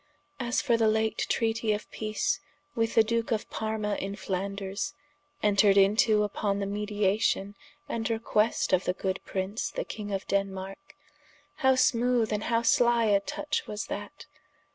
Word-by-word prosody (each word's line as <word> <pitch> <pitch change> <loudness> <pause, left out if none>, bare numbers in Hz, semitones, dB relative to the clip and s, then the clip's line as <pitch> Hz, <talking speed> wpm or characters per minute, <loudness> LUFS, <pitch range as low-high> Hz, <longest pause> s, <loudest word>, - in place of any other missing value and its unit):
As 245 -1 0
for 240 -5 +3
the 225 -1 +3
late 220 0 +1
treatie 225 -1 +1
of 210 - -7
peace 215 -1 -1 0.3
with 225 -3 -1
the 225 - +7
Duke 230 +1 -1
of 220 -2 -1
Parma 215 -1 -2
in 195 +1 -4
Flanders, 195 0 -3 0.5
entred 200 -1 +4
into 210 +2 +4
vpon 200 0 -1
the 200 - -1
mediation, 205 0 0 0.3
and 230 -5 -2
request 225 -2 +1
of 185 0 +3
the 180 - +1
good 190 0 -2
prince 195 +3 -2
the - - -4
King 205 -2 -6
of 195 -1 -3
Denmarke, 195 +6 -3 0.6
how 265 -3 +4
smoothe 240 -2 +2
& 210 -1 0
how 230 0 +1
slie 235 -3 +4
a - - +4
tuche 295 +9 -3
was 210 -1 -4
that? 205 +10 -8
210 Hz, 155 wpm, -28 LUFS, 200-230 Hz, 0.6 s, the